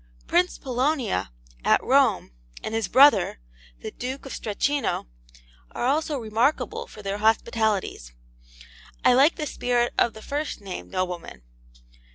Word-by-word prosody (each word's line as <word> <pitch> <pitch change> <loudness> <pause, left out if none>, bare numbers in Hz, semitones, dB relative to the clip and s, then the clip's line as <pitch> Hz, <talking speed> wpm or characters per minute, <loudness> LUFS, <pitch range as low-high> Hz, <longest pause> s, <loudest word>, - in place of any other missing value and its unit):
Prince 355 +1 +1
Polonia, 255 - -1 0.3
at - - +4
Rome, - - +3 0.3
and 220 - -4
his 225 -2 -1
brother, 275 - +5 0.4
the - - -6
Duke 260 +3 -6
of 270 - -7
Strachino, 275 +7 -1 0.7
are - - -2
also 295 +2 +1
remarkable 230 +5 0
for 210 - -12
their 200 +1 -3
hospitalities. 220 - 0 0.9
I 250 - +7
like 275 +6 +5
the 305 - -3
spirit 245 -3 0
of 235 - +3
the 220 - -11
first 290 +2 -3
named 185 - -7
nobleman. 175 - -4
240 Hz, 130 wpm, -25 LUFS, 210-280 Hz, 0.9 s, I